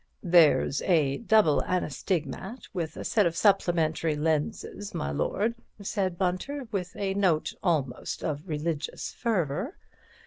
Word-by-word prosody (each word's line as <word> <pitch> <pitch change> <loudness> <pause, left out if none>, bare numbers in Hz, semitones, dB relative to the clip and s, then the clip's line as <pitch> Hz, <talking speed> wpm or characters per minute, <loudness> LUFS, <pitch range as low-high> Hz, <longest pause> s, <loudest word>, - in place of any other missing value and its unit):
"There's 170 -6 +5
a 150 -7 +2
Double 215 -9 +4
Anastigmat 185 - -2
with 165 -4 -3
a - - -5
set 210 -5 +3
of 165 - -3
supplementary 165 -6 +2
lenses, 160 +6 -2
my 70 - -2
lord," 210 - 0 0.3
said 195 -3 -2
Bunter, 200 +10 -2
with 180 -3 -3
a 195 -1 -1
note 185 -6 +1
almost 145 -9 -1
of 150 +3 -3
religious 155 0 -3
fervour. 200 - -1
175 Hz, 125 wpm, -28 LUFS, 155-200 Hz, 0.3 s, There's